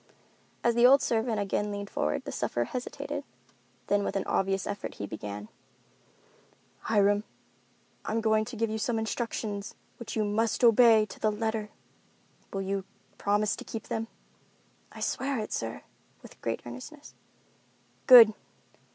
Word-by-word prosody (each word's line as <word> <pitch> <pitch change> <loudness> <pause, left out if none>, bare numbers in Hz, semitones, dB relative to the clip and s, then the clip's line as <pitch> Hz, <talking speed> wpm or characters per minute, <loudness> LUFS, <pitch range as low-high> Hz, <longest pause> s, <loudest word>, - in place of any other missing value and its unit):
As 235 - +3
the 240 +1 +6
old 275 +2 +6
servant 225 -1 0
again 205 +1 -1
leaned 200 0 -6
forward, 75 +1 -1
the - - -5
sufferer 120 - -1
hesitated; 250 - -5 0.6
then 205 0 +1
with - - -3
an 195 - 0
obvious 195 0 0
effort 205 0 -5
he 100 - -5
began. 105 0 -7 1.3
"Hiram, 205 -1 +2 0.8
I - - -4
am 225 - +1
going 220 -1 +2
to 240 - -8
give 225 0 -1
you 220 - -2
some 225 +1 -1
instructions 220 -2 -3 0.2
which 235 -2 -7
you 220 - +1
must 220 +4 0
obey 230 -2 +6
to - - -12
the 215 - +2
letter. 220 0 -2 0.8
Will 195 0 -3
you 195 0 -2 0.4
promise 205 +1 +1
to - - -7
keep 225 - -7
them?" 225 0 -2 0.8
"I - - -11
swear 275 0 -1
it, 215 -1 -4
sir," 115 0 -4 0.4
with - - -15
great 115 - -3
earnestness. 125 - -10 0.9
"Good! 235 -4 +10
215 Hz, 150 wpm, -29 LUFS, 200-230 Hz, 1.3 s, Good